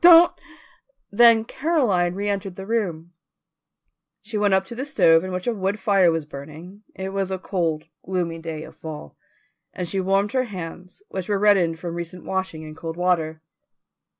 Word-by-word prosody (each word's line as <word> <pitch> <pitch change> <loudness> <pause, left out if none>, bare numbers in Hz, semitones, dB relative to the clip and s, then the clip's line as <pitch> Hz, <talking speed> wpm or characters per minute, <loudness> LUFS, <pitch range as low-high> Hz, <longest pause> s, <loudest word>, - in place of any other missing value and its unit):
Don't!" 345 0 +9 0.8
Then 225 +1 +6
Caroline 235 - +1
reentered 200 -2 -2
the 190 - -7
room. 180 -7 -2 1.1
She 215 +1 -7
went 205 -2 +3
up 190 0 +1
to 215 - -8
the 250 +3 -3
stove 165 - +4
in 185 - -4
which 180 0 -3
a 240 - +1
wood 195 0 -1
fire 190 -3 +4
was 165 -2 -2
burning 155 +7 -10
it 190 0 -4
was 195 -1 -2
a 190 - -2
cold, 170 -5 -1 0.2
gloomy 175 -3 -2
day 160 -1 -5
of - - -12
fall 150 - -8 0.6
and 180 - -4
she 195 +3 -1
warmed 195 +2 +1
her 255 -1 +1
hands, 180 - -8
which 190 +1 -5
were 205 - +2
reddened 195 -5 +3
from 170 0 -5
recent 170 +1 -6
washing 190 -4 -3
in 155 0 -8
cold 165 +1 -6
water. 160 -3 0
185 Hz, 175 wpm, -23 LUFS, 165-205 Hz, 1.1 s, Don't